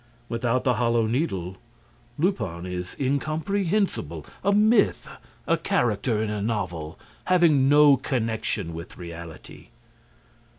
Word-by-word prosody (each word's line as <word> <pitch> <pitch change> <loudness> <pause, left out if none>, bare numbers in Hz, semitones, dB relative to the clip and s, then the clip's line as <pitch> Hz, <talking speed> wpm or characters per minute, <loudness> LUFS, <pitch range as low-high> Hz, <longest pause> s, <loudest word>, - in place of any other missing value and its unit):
Without 120 +1 0
the 125 - +3
Hollow 115 -1 +2
Needle, 95 - -2 0.6
Lupin 145 - -1
is 90 0 -5
incomprehensible, 155 - -1 0.2
a 200 - +3
myth, 210 +1 +3 0.4
a - - +2
character 110 -1 0
in 105 - -2
a 105 -1 -3
novel, 90 -7 -3 0.3
having 160 -7 +4
no 145 -1 +7
connection 110 - -2
with 85 +2 -9
reality. 85 -2 -10
115 Hz, 110 wpm, -25 LUFS, 90-150 Hz, 0.6 s, no